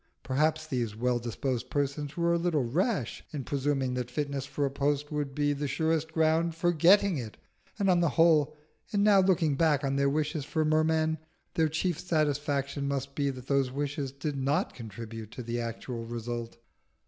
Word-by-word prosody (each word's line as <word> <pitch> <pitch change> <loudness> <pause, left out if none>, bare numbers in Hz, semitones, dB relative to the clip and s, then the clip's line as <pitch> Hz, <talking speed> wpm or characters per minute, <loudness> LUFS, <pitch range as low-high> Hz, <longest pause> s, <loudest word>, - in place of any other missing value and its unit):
Perhaps 155 +4 +1
these 120 -8 -2
well 120 +2 +1
disposed 120 +1 -3
persons 145 +1 -2
were 170 0 +2
a 170 - +2
little 165 -5 +1
rash 155 - -1
in 145 -4 -4
presuming 135 -1 0
that 125 -1 -3
fitness 140 0 -3
for 145 0 -1
a 135 - -1
post 145 +1 0
would 145 -2 -3
be 145 0 +2
the 145 +1 -2
surest 160 +3 0
ground 160 +1 +2
for 175 +1 +2
getting 180 +1 +5
it; 110 -4 -7 0.4
and 200 -2 +1
on 180 -2 +4
the 170 -2 +3
whole, 155 -1 +4 0.3
in 205 -1 +2
now 205 -2 +6
looking 175 -6 +3
back 150 -1 +2
on 135 0 0
their 140 0 +3
wishes 150 +1 -1
for 155 +2 0
Merman, 160 0 +2 0.3
their 160 -1 +2
chief 160 +1 -1
satisfaction 145 -3 0
must 140 0 -2
be 140 0 0
that 130 -2 -6
those 135 -1 +2
wishes 140 0 -3
did 140 +2 -4
not 135 +3 0
contribute 115 -1 -8
to 125 - -6
the 120 +1 -2
actual 115 +1 -5
result. 120 0 -5
145 Hz, 185 wpm, -29 LUFS, 130-160 Hz, 0.4 s, now